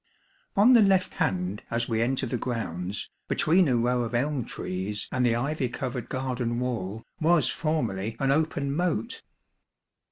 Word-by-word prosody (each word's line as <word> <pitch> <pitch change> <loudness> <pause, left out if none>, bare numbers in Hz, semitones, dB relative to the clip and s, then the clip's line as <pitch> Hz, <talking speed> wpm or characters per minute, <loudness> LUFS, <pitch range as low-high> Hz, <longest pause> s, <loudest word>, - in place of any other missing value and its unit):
On 215 +6 +6
the 235 - +8
left 195 -2 +3
hand 95 +2 -1
as 115 0 -1
we 115 -1 0
enter 130 +3 +1
the 125 - -2
grounds, 100 -6 -3 0.2
between 175 +2 +4
a 130 - +2
row 120 +1 +1
of 120 0 -3
elm 135 0 0
trees 95 +3 -4
and 125 - +1
the 120 -2 +3
ivy 135 +1 -1
covered 125 0 -4
garden 125 -2 -2
wall, 115 -4 -3 0.2
was 155 -5 +3
formerly 115 - -1
an 135 -1 +2
open 145 -2 0
moat. 170 -9 -1
125 Hz, 155 wpm, -27 LUFS, 115-150 Hz, 0.2 s, the